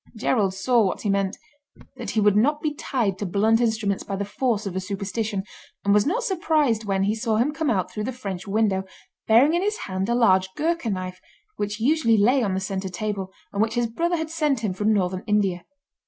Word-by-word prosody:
Gerald 210 -4 +1
saw 235 +5 +3
what 190 -3 0
he 205 - +1
meant—that 240 +10 -5
he 220 - 0
would 205 -1 +4
not 290 +8 +3
be 300 -1 -2
tied 230 -10 -1
to 205 - -2
blunt 220 +5 +2
instruments 220 -4 0
by 195 - -4
the 200 +1 -2
force 220 0 -1
of 190 -2 -4
a - - 0
superstition, 200 +1 -3 0.4
and 200 - +4
was 210 +3 +3
not 455 +10 0
surprised 310 - +1
when 195 -1 0
he 205 +2 +1
saw 225 0 -1
him 260 +7 +1
come 315 -1 -1
out 190 -6 0
through 210 0 -4
the 260 - -2
French 195 -7 -6
window, 200 -2 +1 0.4
bearing 245 +8 +5
in 345 - +2
his 420 +2 0
hand 190 +1 -2
a 235 - +2
large 190 -6 +4
Ghourka 330 -5 0
knife, 185 -1 -5 0.4
which 205 +1 -3
usually 235 -2 +3
lay 250 +6 +4
on 200 -5 0
the - - 0
centre 190 0 -3
table, 195 0 -4 0.2
and 200 - 0
which 220 +1 0
his 240 0 +2
brother 340 +10 -1
had 320 -1 -4
sent 300 -7 0
him 210 -5 -1
from 210 +3 +1
Northern 185 -2 0
India. 195 -4 +1
215 Hz, 215 wpm, -24 LUFS, 195-255 Hz, 0.4 s, bearing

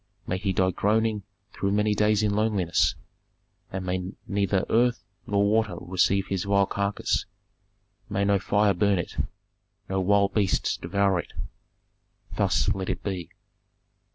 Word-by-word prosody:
May 90 - -2
he 100 0 -1
die 95 0 +2
groaning 110 +2 +1 0.3
through 100 0 -1
many 105 +1 +2
days 105 +1 +2
in 105 -1 +1
loneliness, 100 -5 +1 0.8
and 95 0 -4
may 90 +1 -3
neither 100 -1 +1
earth 120 +1 +2 0.2
nor 100 0 +2
water 110 -3 +1
receive 95 +2 +1
his 95 -1 -2
vile 100 0 +3
carcass, 100 +1 -1 0.8
may 100 0 0
no 100 0 +3
fire 105 +1 +2
burn 100 +2 +2
it, 85 - -5 0.7
no 95 0 -1
wild 100 +1 +3
beasts 100 -4 +1
devour 100 -2 +1
it!" - - -7 1.0
"Thus - - +1
let 95 -1 -4
it - - -3
be!" 95 -5 -4
100 Hz, 140 wpm, -26 LUFS, 95-105 Hz, 1.0 s, vile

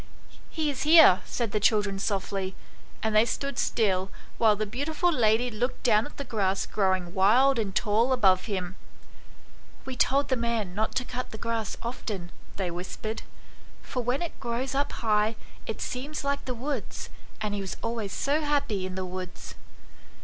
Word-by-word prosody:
"He 310 -3 -1
is 270 -1 -5
here," 305 - +8
said 235 -4 -2
the 210 - +1
children 205 -2 +2
softly, 195 -1 -2 0.5
and 220 -1 0
they 215 - +7
stood 275 +3 -2
still, 195 -4 +1 0.3
while 220 -2 +5
the 215 +1 -1
beautiful 290 - 0
lady 240 -1 +3
looked 245 +4 -2
down 220 -1 +4
at - - -15
the 280 - -3
grass 195 -6 0
growing 185 -3 0
wild 235 +7 +5
and 195 -4 -2
tall 225 +5 +2
above 190 -8 +4
him. 190 -3 -3 1.1
"We 265 - -5
told 275 +4 +2
the 260 - +3
man 230 -6 -1
not 215 +3 -1
to 250 - 0
cut 250 +1 -5
the 220 - -8
grass 230 -2 -3
often," 205 -7 -5 0.2
they 185 -3 -2
whispered; 185 +5 -5 0.3
" - - -25
for 250 - -3
when 250 +7 0
it 340 - -6
grows 240 +2 -2
up 280 +1 0
high 215 -1 +1 0.3
it 220 - -4
seems 280 +5 -4
like 280 0 -1
the 255 - -3
woods, 260 -1 -4 0.3
and 210 -1 -2
he 205 - -2
was 190 -3 -5
always 230 -3 -2
so 290 +8 0
happy 280 -11 0
in 185 - -6
the 190 0 -3
woods." 185 0 -7
220 Hz, 175 wpm, -27 LUFS, 195-255 Hz, 1.1 s, here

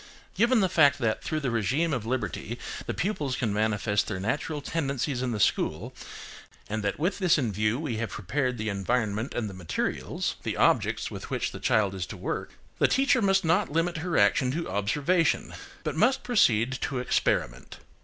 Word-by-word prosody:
GIVEN 235 +1 +3
the 190 - +3
fact 145 -5 +4
that, 115 -5 -1
through 155 - -1
the 135 - -1
régime 130 +8 +1
of 115 -4 -3
liberty 120 -2 -3 0.3
the - - -1
pupils 150 -9 -1
can 115 -5 -1
manifest 105 -1 +1
their 95 - -3
natural 145 +9 -2
tendencies 140 -4 -2
in 130 -1 -1
the 110 - -2
school, 100 +5 0 0.7
and 110 0 -3
that 100 -1 -1
with 180 +7 -1
this 180 -5 +4
in 125 -7 0
view 105 +3 0
we 140 -7 -3
have 115 0 -2
prepared 125 +5 -2
the 110 0 -3
environment 110 +3 -1
and 115 -3 -1
the 100 - -7
materials 90 -3 -3
(the - - -3
objects - - +2
with - - -7
which - - -1
the - - -8
child 100 -3 +2
is 95 -2 -4
to - - -8
work), - - -4 0.3
the - - +5
teacher 270 -1 +3
must 195 -2 +3
not 170 +2 +2
limit 165 +2 0
her 165 +1 -1
action 105 +5 +4
to 165 +5 -3
observation, 145 - +1 0.3
but - - -2
must 265 +1 +3
proceed 125 - +3
to 140 -4 -2
experiment. 65 - -1
125 Hz, 185 wpm, -27 LUFS, 105-160 Hz, 0.7 s, the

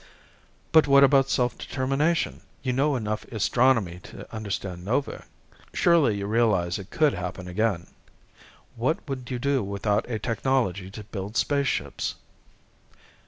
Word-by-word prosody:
"But 160 -2 +6
what 140 0 +7
about 135 0 +5
self 125 -2 0
determination? 145 +5 0 0.2
You 130 -2 0
know 140 +3 +2
enough 110 -3 -2
astronomy 115 -4 +1
to - - -10
understand 100 -4 -4
novae. 125 +8 -1 0.5
Surely 155 -11 +4
you 100 - -3
realize 105 -5 +1
it 100 +1 -10
could 155 -3 +2
happen 90 0 -5
again. 90 -1 0 0.9
What 130 +8 +1
would 130 -3 -5
you 125 - -2
do 140 +2 +1
without 100 +2 -1
a 115 - -1
technology 110 -4 -1
to 105 +2 -9
build 100 +1 -6
spaceships?" 140 -2 0
115 Hz, 130 wpm, -26 LUFS, 100-135 Hz, 0.9 s, what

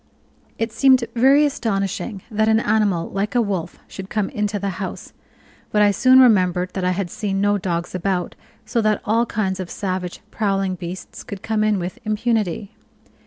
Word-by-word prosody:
It 225 0 -2
seemed 260 0 +4
very 270 +5 +5
astonishing 200 -5 -2
that 220 0 +1
an 220 0 +4
animal 210 -6 +1
like 200 +4 -2
a - - +4
wolf 190 -7 -2
should 190 0 -9
come 210 -2 -1
into 210 0 -2
the 200 0 -2
house; 190 - -6 0.6
but 210 -1 +4
I 205 - +5
soon 255 +6 +5
remembered 185 -7 +4
that 190 - -3
I 180 - +2
had 185 -1 -2
seen 195 -3 -2
no 205 0 +2
dogs 175 -1 -3
about, 185 -1 -1 0.3
so 235 - 0
that 215 -1 +1
all 230 +3 +2
kinds 195 -4 -2
of 185 -2 -5
savage, 185 -2 -4
prowling 195 -3 0
beasts 180 0 -7
could 200 -2 -8
come 220 -1 0
in 215 -1 +2
with 180 +6 -5
impunity. 215 -3 -1
205 Hz, 175 wpm, -21 LUFS, 185-220 Hz, 0.6 s, very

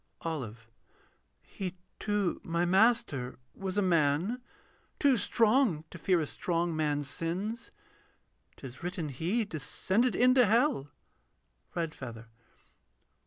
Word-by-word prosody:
OLIVE. 120 -9 -4 0.8
He 185 -2 -6 0.2
too, 205 -4 0
my 170 +1 0
Master, 190 - +2 0.2
was 195 0 -4
a 205 - +3
man: 170 - +2 0.6
too 280 -3 +4
strong 225 - +3
To 170 - -9
fear 180 +1 +3
a 155 - 0
strong 170 +2 -1
man's 145 -2 0
sins: 190 +10 -3 0.9
'tis 130 -2 -10
written 175 -3 -3
He 180 - 0
Descended 200 - 0
into 250 -1 +5
hell. 230 - +2 0.9
REDFEATHER. 130 -9 -4
175 Hz, 105 wpm, -31 LUFS, 150-220 Hz, 0.9 s, into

